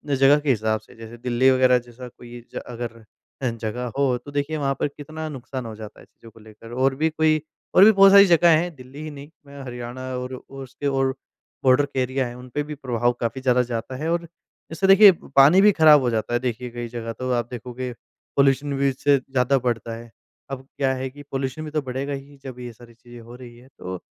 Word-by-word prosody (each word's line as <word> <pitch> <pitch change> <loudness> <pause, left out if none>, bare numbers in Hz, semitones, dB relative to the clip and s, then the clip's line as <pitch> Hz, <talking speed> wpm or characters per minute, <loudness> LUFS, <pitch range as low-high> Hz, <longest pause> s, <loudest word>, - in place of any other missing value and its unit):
जगह 135 +2 +5
के 145 -1 -3
हिसाब 110 -2 +1
से, - - -19
जैसे 115 +1 -11
दिल्ली 125 +2 +2
वग़ैरह 130 -1 +4
जैसा 120 +1 -12
कोई 120 0 -13
ए 120 - -9
अगर 115 -1 -7 0.4
अ, 130 - 0
जगह 115 +2 -5
हो 135 -3 +2
तो 145 - -9
देखिए 145 +2 -2
वहाँ 140 -2 0
पर - - +1
कितना 155 +2 -8
नुकसान 130 -2 -7
हो 115 - -7
जाता 110 -1 -11
है - - -16
चीज़ों 115 - -18
को 115 - -18
लेकर 110 +1 -14
और 130 +1 +1
भी 160 +4 +1
कोई 155 0 +1 0.3
और 185 - +8
भी 220 - +8
बहुत 195 -1 +6
सारी 200 0 +9
जगह 170 -2 +5
हैं। 175 +1 -2
दिल्ली 130 +2 -12
ही 155 - -6
नहीं, 140 0 -10 0.4
हरियाणा 120 0 -7 0.2
और 125 +1 -5
उसके 135 +2 -8
और 135 -1 +1 0.5
बॉर्डर 130 +2 +4
के 140 -2 -5
एरिया 130 +1 -1
हैं 120 - -9
उनपे 125 +3 -5
भी 150 +1 -7
प्रभाव 120 -3 0
काफ़ी 120 +3 -3
ज़्यादा 125 -1 +3
जाता 115 +2 -4
है 155 +5 -3
और 170 - 0 0.5
जैसे 180 +4 0
देखिए 195 +1 +9 0.2
पानी 145 +8 +7
भी 210 - +7
ख़राब 155 -5 +6
हो 125 - 0
जाता 115 +1 -2
है, 120 - +2
देखिए, 125 0 -4
कई 120 0 -6
जगह 115 -1 -6
तो 130 +2 -4
आप 120 -1 -1
देखोगे 125 +1 -6 0.5
पॉल्यूशन 140 +1 +2
भी 140 0 +2
इससे 140 +2 +2
ज़्यादा 130 0 0
बढ़ता 115 -2 -2
है। 115 0 -11 0.4
अब 135 0 -7
क्या 135 -1 +1
है 130 0 -4
कि 145 +2 -13
पॉल्यूशन 135 +3 -3
भी 155 - -7
तो 155 0 -1
बढ़ेगा 135 +1 -4
ही, 140 +1 -9
जब 130 -2 -9
ये 125 -1 -7
सारी 120 +1 -17
चीज़ें 120 +1 -14
हो 115 +1 -12
रही 120 -1 -12
है, 125 +2 -17
तो 90 0 -6
130 Hz, 225 wpm, -23 LUFS, 120-145 Hz, 0.5 s, सारी